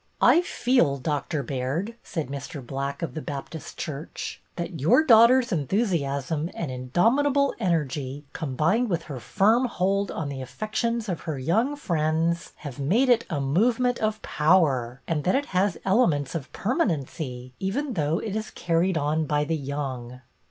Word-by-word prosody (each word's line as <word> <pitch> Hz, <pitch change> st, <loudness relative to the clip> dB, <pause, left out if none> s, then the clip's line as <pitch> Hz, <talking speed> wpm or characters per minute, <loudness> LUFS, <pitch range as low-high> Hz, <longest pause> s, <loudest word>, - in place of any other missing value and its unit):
" -, -, -38 dB
I 340 Hz, -, +5 dB
feel. 245 Hz, -, +2 dB
Doctor 140 Hz, +1 st, -2 dB
Baird," 140 Hz, -, -2 dB
said 160 Hz, -4 st, -3 dB
Mr. 140 Hz, 0 st, -7 dB
Black 140 Hz, +3 st, -4 dB
of 165 Hz, -, -3 dB
the 155 Hz, -, -4 dB
Baptist 145 Hz, +3 st, -7 dB
church, 155 Hz, 0 st, -6 dB
" -, -, -41 dB
that 170 Hz, -2 st, -5 dB
your 230 Hz, -, +5 dB
daughter's 240 Hz, 0 st, +6 dB
enthusiasm 155 Hz, -, 0 dB
and 160 Hz, -6 st, -3 dB
indomitable 240 Hz, -, +2 dB
energy, 145 Hz, -, -1 dB
com 135 Hz, -5 st, -4 dB
bined 215 Hz, +11 st, +2 dB
with 170 Hz, -5 st, -1 dB
her 140 Hz, -6 st, -7 dB
firm 220 Hz, -, +3 dB
hold 200 Hz, -3 st, 0 dB
on 150 Hz, -3 st, -3 dB
the 135 Hz, -2 st, -5 dB
affections 215 Hz, -, -2 dB
of 180 Hz, -5 st, -3 dB
her 150 Hz, -, -2 dB
young 220 Hz, -, +1 dB
friends, 165 Hz, -, 0 dB
have 145 Hz, -2 st, -8 dB
made 215 Hz, -, +2 dB
it 240 Hz, -2 st, +4 dB
a 160 Hz, -5 st, -1 dB
move 190 Hz, -, +2 dB
ment 250 Hz, -1 st, +1 dB
of 215 Hz, 0 st, 0 dB
power, 140 Hz, -7 st, +2 dB
and 155 Hz, -3 st, -1 dB
that 185 Hz, -, +2 dB
it 285 Hz, +1 st, +1 dB
has 185 Hz, 0 st, +2 dB
elements 180 Hz, -, +2 dB
of 155 Hz, -5 st, -5 dB
permanency, 145 Hz, -, -2 dB
even 255 Hz, +9 st, -2 dB
though 155 Hz, -3 st, 0 dB
it 210 Hz, +1 st, -4 dB
is 220 Hz, 0 st, -3 dB
carried 170 Hz, +1 st, 0 dB
on 155 Hz, +1 st, 0 dB
by 150 Hz, 0 st, +1 dB
the 160 Hz, +2 st, -1 dB
young." 130 Hz, -4 st, -5 dB
165 Hz, 165 wpm, -26 LUFS, 140-215 Hz, -, daughter's